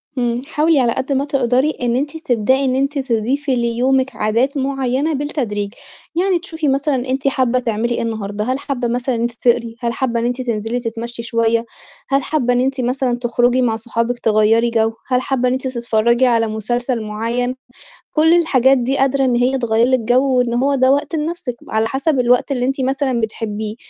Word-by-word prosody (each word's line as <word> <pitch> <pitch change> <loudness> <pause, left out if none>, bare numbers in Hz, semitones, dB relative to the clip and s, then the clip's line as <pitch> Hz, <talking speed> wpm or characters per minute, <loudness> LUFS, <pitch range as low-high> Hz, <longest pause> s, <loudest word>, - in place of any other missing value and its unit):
إمم. 240 -2 -1
حاولي 310 0 +2
على 240 -2 +2
قد 265 - -3
ما 275 +1 +1
تقدري 265 0 +1
إن 240 -1 +1
أنتِ 290 +4 -2
تبدئي 260 -2 +1
إن 255 -1 +1
أنتِ 275 +2 0
تضيفي 260 +3 0
ليومِك 250 +2 +1
عادات 230 +7 0
معيّنة 270 +2 -1
بالتدريج، 235 -8 -2 0.4
يعني 365 +1 +2
تشوفي 320 -3 -4
مثلًا 275 +1 +1
أنتِ 270 +1 -1
حابّة 255 -2 +1
تعملي 235 0 -1
إيه - - -2
النهارده، 210 -2 -3
هل 255 +4 -1
حابّة 265 -4 -3
مثلًا 245 +2 -1
إن 230 - -2
أنتِ 235 0 0
تقري؟ 235 -1 +1
هل 235 -2 -2
حابّة 235 -1 -1
إن 230 - -1
أنتِ 245 +1 -1
تنزلي 230 -1 -2
تتمشّي 235 0 -5
شويّة؟ 230 0 +1 0.4
هل 275 0 +2
حابّة 255 -6 0
إن 245 - +2
أنتِ 265 +1 0
مثلًا 250 0 0
تخرجي 245 +1 +1
مع 235 -3 +1
صحابِك 230 +1 -2
تغيّري 225 +2 +3
جَو؟ 225 -1 +1
هل 250 -1 +1
حابّة 255 -1 0
إن 250 - +1
أنتِ 260 0 -2
تتفرّجي 235 0 +1
على 230 -2 +2
مسلسل 240 +3 -2
معيّن؟ 230 +4 -2 0.6
كل 320 +2 +4
الحاجات 270 -6 +4
دي 255 +3 -1
قادرة 270 0 +2
إن 250 -2 +2
هي 250 +2 +2
تغيّر 235 -1 +2
لِك 260 0 +2
جَو 255 +3 +2
وإن 245 -1 +1
هو 270 +4 +1
ده 260 0 +4
وقت 285 +3 0
لنَفْسِك، 305 -5 -3
على 220 0 +1
حَسَب 270 +2 0
الوقت 250 +3 +2
اللي 250 -2 0
أنتِ 270 +1 -1
مثلًا 260 -2 0
بتحبّيه. 215 -1 -4
250 Hz, 190 wpm, -18 LUFS, 235-270 Hz, 0.6 s, كل